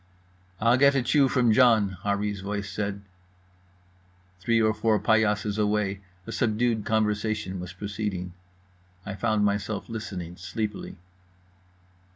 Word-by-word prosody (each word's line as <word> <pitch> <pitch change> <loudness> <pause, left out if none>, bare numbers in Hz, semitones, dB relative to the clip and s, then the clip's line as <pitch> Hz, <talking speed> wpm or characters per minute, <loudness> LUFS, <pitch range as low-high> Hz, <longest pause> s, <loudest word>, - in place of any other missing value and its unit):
"I'll 115 +3 +4
get 140 +1 +5
a 135 - +2
chew 140 +3 +4
from 125 -4 +3
John" 110 -5 +4
Harree's 100 0 -1
voice 100 +1 -4
said. 100 -1 -3 1.4
Three 115 +4 +2
or 110 -1 +3
four 110 0 +1
paillasses 105 -1 +1
away, 105 -2 0 0.2
a - - -7
subdued 115 -1 0
conversation 105 -3 -1
was 90 0 -6
proceeding. 100 -2 -4 0.7
I 105 - -4
found 110 0 +1
myself 100 +1 -2
listening 95 -6 -6
sleepily. 100 +2 -5
105 Hz, 120 wpm, -26 LUFS, 100-110 Hz, 1.4 s, get